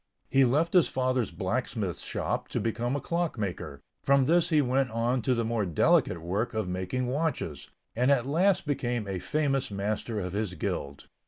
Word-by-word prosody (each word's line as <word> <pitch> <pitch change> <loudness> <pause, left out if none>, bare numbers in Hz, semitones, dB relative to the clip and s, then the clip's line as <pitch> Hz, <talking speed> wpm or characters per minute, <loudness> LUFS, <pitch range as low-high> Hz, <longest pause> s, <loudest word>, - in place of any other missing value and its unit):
He 135 0 +5
left 150 +7 +1
his 180 -4 +6
father's 130 -2 0
blacksmith 105 -2 -2
shop - - -2
to - - -2
become 120 +3 -1
a - - 0
clock 170 -1 -2
maker, 90 -8 -4 0.2
from 140 -1 +4
this 170 +3 +3
he 155 -3 +4
went 135 -1 +2
on 120 +3 0
to 130 +2 +1
the 115 -1 0
more 115 -1 0
delicate 85 -1 +2
work 100 +7 -2
of 110 -4 -1
making 95 +8 -2
watches, 125 - -2 0.3
and 125 +3 +2
at 130 -4 +3
last 175 +8 +2
became 120 -6 -1
a 95 -2 -3
famous 140 - 0
master 105 +2 -2
of 90 -2 -4
his 100 -3 -2
guild. 70 -3 -4
120 Hz, 180 wpm, -28 LUFS, 100-135 Hz, 0.3 s, his